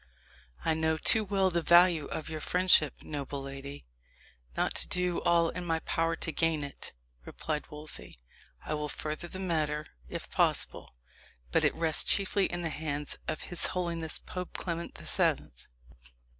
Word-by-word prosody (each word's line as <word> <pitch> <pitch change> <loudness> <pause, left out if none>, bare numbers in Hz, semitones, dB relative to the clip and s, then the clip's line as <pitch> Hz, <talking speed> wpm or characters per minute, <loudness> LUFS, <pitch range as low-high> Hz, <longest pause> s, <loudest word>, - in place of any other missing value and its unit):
"I 160 - +3
know 160 0 +1
too 220 +7 +5
well 195 -2 +2
the 170 0 +1
value 170 -2 +6
of 155 - -5
your 155 -1 -5
friendship, 180 -5 +3
noble 140 -2 -4
lady, 135 - -7 0.7
not - - +1
to - - +4
do 180 -1 0
all 170 -1 +4
in 180 - -5
my 165 -2 0
power 165 0 0
to 160 - -3
gain 160 -2 +1
it," 140 - -8 0.3
replied 150 - -4
Wolsey. 150 - -4 0.5
"I - - -2
will 150 0 -2
further 155 +4 -4
the 185 - -7
matter, 155 -5 -1 0.2
if - - -6
possible. - - +1 0.6
But - - +3
it - - +3
rests 160 -2 +2
chiefly 195 0 +3
in 175 0 -4
the 165 - 0
hands 150 -2 -4
of 155 - -2
his 175 - +1
holiness 170 -3 -1
Pope 180 -1 -7
Clement 170 -1 -4
the - - -10
Seventh." - - 0
160 Hz, 160 wpm, -30 LUFS, 150-175 Hz, 0.7 s, value